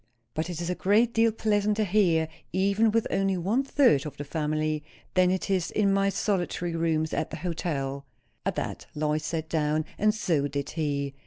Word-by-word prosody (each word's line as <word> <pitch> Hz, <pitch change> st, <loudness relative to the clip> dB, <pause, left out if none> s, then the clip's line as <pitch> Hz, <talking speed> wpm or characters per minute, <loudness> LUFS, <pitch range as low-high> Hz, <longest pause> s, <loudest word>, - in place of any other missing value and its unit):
But 160 Hz, +3 st, -2 dB
it 170 Hz, -2 st, -4 dB
is 170 Hz, -, -3 dB
a -, -, +1 dB
great 215 Hz, +6 st, +2 dB
deal 225 Hz, 0 st, +4 dB
pleasanter 210 Hz, -1 st, +1 dB
here, 175 Hz, -5 st, +3 dB, 0.2 s
even 200 Hz, +4 st, +3 dB
with 225 Hz, +1 st, +1 dB
only 195 Hz, -1 st, +1 dB
one 200 Hz, +9 st, +1 dB
third 260 Hz, -, +4 dB
of 150 Hz, -, -9 dB
the 145 Hz, -, -4 dB
family, 155 Hz, 0 st, -1 dB, 0.3 s
than 185 Hz, -1 st, +4 dB
it 185 Hz, 0 st, -1 dB
is 185 Hz, -3 st, +1 dB
in 200 Hz, -2 st, +2 dB
my 195 Hz, 0 st, +3 dB
solitary 180 Hz, -3 st, -1 dB
rooms 160 Hz, -1 st, 0 dB
at -, -, -1 dB
the 155 Hz, -, -6 dB
hotel." 150 Hz, -5 st, -3 dB, 0.4 s
At -, -, -1 dB
that -, -, -4 dB
Lois 150 Hz, 0 st, 0 dB
sat 160 Hz, -1 st, -3 dB
down, 155 Hz, -1 st, 0 dB
and 215 Hz, +1 st, +4 dB
so 160 Hz, -9 st, +1 dB
did 140 Hz, 0 st, -4 dB
he. 140 Hz, -3 st, -2 dB
175 Hz, 185 wpm, -27 LUFS, 155-200 Hz, 0.4 s, deal